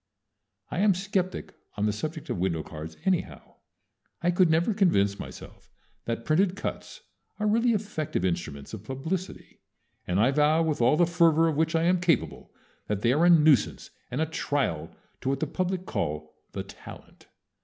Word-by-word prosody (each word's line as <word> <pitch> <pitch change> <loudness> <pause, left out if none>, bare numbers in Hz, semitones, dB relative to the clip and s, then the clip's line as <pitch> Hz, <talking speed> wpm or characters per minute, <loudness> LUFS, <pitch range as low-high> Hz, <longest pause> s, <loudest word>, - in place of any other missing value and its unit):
I 175 - -2
am 200 -1 +4
skeptic 190 -1 -2 0.2
on 105 - 0
the 105 - +1
subject 155 +8 -5
of - - -2
window 85 -4 0
cards 80 0 -9
anyhow. 165 - -2 0.7
I 175 - +3
could 180 -1 +4
never 165 +7 +2
convince 100 - +2
myself - - -10 0.4
that 115 0 -3
printed 180 +4 +2
cuts 200 - -6 0.4
are 210 - -2
really 230 +3 +3
effective 195 - -2
instruments 75 -4 -3
of 110 -3 -7
publicity, 160 - -5 0.5
and 90 +2 +1
I 120 +5 +4
vow 150 +3 +3
with 155 -5 -1
all 120 +6 +4
the 175 - +5
fervor 165 -1 +4
of 160 - 0
which 160 +2 +1
I 165 - +2
am 180 +1 +2
capable 150 - 0 0.4
that 105 -1 -2
they 120 +1 +4
are 160 +5 +3
a - - +6
nuisance 155 -8 +4 0.2
and 125 - -3
a - - +3
trial 145 - -2 0.3
to - - -1
what 135 0 0
the - - 0
public 185 0 -2
call 75 - -3 0.2
"the - - -4
talent." - - -13
155 Hz, 175 wpm, -27 LUFS, 105-180 Hz, 0.7 s, a